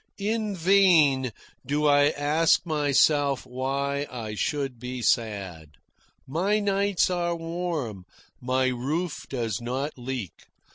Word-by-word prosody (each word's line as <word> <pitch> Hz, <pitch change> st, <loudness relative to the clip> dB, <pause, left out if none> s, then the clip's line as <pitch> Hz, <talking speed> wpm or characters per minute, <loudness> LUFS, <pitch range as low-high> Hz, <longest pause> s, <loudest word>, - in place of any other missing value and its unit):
In 215 Hz, 0 st, -1 dB
vain 165 Hz, -8 st, +4 dB, 0.3 s
do 145 Hz, +3 st, -1 dB
I 145 Hz, 0 st, +5 dB
ask 155 Hz, +3 st, +2 dB
myself 145 Hz, -3 st, +2 dB
why 140 Hz, +3 st, -2 dB
I 110 Hz, -4 st, -6 dB
should 135 Hz, +2 st, -2 dB
be 125 Hz, 0 st, -5 dB
sad. 95 Hz, -11 st, -1 dB, 0.5 s
My 180 Hz, +10 st, 0 dB
nights 200 Hz, -2 st, +1 dB
are 175 Hz, -1 st, 0 dB
warm. 165 Hz, -, -4 dB, 0.4 s
My 130 Hz, +1 st, +1 dB
roof 145 Hz, +7 st, -3 dB
does 115 Hz, -6 st, -3 dB
not 130 Hz, +5 st, -3 dB
leak. 125 Hz, -7 st, -6 dB
140 Hz, 110 wpm, -26 LUFS, 125-170 Hz, 0.5 s, I